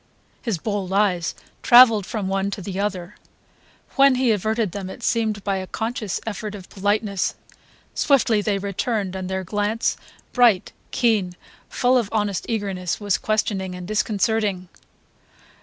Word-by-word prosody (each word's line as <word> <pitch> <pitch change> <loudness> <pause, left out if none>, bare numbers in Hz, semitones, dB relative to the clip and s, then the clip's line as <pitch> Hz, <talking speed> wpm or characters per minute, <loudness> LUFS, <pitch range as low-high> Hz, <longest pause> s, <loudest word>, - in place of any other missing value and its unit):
His 225 -7 -2
bold 200 +1 -3
eyes 190 -4 +1 0.3
travelled 230 -5 +7
from 210 -3 -3
one 195 +1 0
to 200 - -5
the 190 +1 -5
other. 190 -2 -3 0.8
When 275 -1 +6
he 250 -2 +2
averted 215 0 0
them 190 0 -5
it 235 - -10
seemed 220 -4 0
by 195 -1 0
a 185 0 -5
conscious 225 -2 -3
effort 215 -1 -5
of 190 -3 -11
politeness; 205 0 -1 0.6
swiftly 235 -7 +3
they 205 -1 0
returned, 200 0 -2
and 185 -1 -4
their 190 0 -2
glance, 210 +4 -1 0.4
bright, 235 -7 +4 0.2
keen, 210 -7 +1 0.3
full 250 +1 +3
of 220 -4 -3
honest 205 -3 -1
eagerness, 195 -5 -2
was 205 -2 0
questioning 195 -4 -1
and 180 -1 -8
disconcerting. 210 -3 0
205 Hz, 140 wpm, -22 LUFS, 190-225 Hz, 0.8 s, travelled